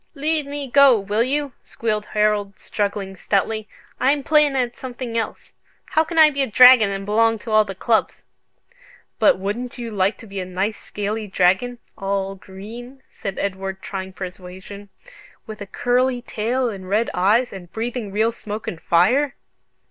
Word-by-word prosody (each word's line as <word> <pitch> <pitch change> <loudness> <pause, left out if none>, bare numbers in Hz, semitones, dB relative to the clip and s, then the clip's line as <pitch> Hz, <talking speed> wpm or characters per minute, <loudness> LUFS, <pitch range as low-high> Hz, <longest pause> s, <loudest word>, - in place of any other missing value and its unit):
"Leave 300 0 -1
me 285 -1 -5
go, 270 -2 +6
will 205 +3 -1
you?" 280 +3 0
squealed 215 -2 -3
Harold, 210 -2 0
struggling 200 -2 -3
stoutly. 210 +3 -1 0.3
"I'm 280 +2 +2
playin' 300 -2 +3
at 245 -2 0
something 250 -2 -6
else. 225 - -4 0.4
How 315 - +4
can 330 +1 -6
I 310 -1 +8
be 280 -1 -2
a 270 - +1
dragon 250 -2 +8
and 195 0 -4
belong 225 +2 +3
to 220 +1 -8
all 215 0 +5
the 195 -1 -7
clubs?" 220 +3 0 1.0
"But 280 - +5
wouldn't 210 +7 -4
you 235 -2 -5
like 195 0 +1
to - - -12
be 200 -2 -6
a - - -2
nice 190 +4 -2
scaly 210 +1 -4
dragon, 195 +6 +2 0.2
all 195 0 -1
green," 225 +8 -11
said 195 -2 -6
Edward, 190 -1 -4
trying 190 -1 -5
persuasion, 190 +2 -9 0.6
"with 215 -1 -9
a 205 - -6
curly 245 +2 0
tail 245 +3 -1
and 190 -4 -6
red 215 +4 +1
eyes, 215 +7 +2
and 175 -3 -10
breathing 225 -1 -4
real 220 +3 +2
smoke 215 -1 -7
and 165 - -5
fire?" 250 +12 +3
215 Hz, 165 wpm, -21 LUFS, 195-250 Hz, 1.0 s, I